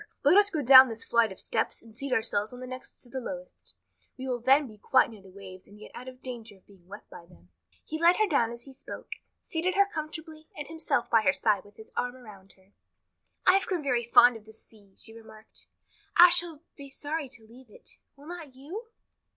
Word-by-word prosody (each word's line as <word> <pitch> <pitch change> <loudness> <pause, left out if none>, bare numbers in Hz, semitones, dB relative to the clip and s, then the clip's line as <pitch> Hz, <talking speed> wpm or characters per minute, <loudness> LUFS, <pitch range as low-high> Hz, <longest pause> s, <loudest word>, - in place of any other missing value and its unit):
Let 290 +6 +5
us 410 0 +6
go 310 -7 -2
down 260 0 +9
this 225 0 -5
flight 230 -3 +2
of 190 - -10
steps 220 - -2
and 225 -2 -17
seat 275 +2 -4
ourselves 220 -3 0
on 250 - -10
the 255 - -7
next 255 0 -9
to 245 - -17
the 260 - -4
lowest. 270 +2 -9 0.4
We 260 0 -6
will 250 -2 -2
then 270 +5 +4
be 215 -4 -13
quite 255 +3 +3
near 215 -3 -13
the 190 - -16
waves 185 -1 -12
and 205 +1 -16
yet - - -12
out 250 - -9
of 255 0 -11
danger 235 -4 -8
of 190 - -29
being 190 -3 -21
wet 205 +2 -11
by 170 - -12
them." 85 - -21 0.4
He 315 - -5
led 340 +2 +5
her 430 - +3
down 260 - +1
as 235 0 -8
he 270 - -12
spoke, 265 - -9 0.3
seated 345 +3 -2
her 400 0 +5
comfortably 315 -3 -7
and 295 -1 -6
himself 315 -7 -1
by 225 - +5
her 190 -3 +3
side 205 -3 +1
with 205 0 -18
his 220 - -13
arm 250 0 -2
around 205 -6 -15
her. 190 +1 -28 0.7
"I've 380 +1 +4
grown 355 -5 -2
very 250 -4 +1
fond 240 +1 +6
of 220 -1 -12
the 220 - -14
sea," 205 -3 -17
she 225 - -6
remarked. 220 -1 -14 0.5
"I 350 +1 +10
shall 335 -3 +1
be 280 -1 -11
sorry 290 +1 -4
to 235 -4 -12
leave 240 +2 -17
it. - - -9 0.2
Will 280 +1 -17
not 325 -5 -9
you?" 350 - -8
250 Hz, 230 wpm, -28 LUFS, 220-300 Hz, 0.7 s, I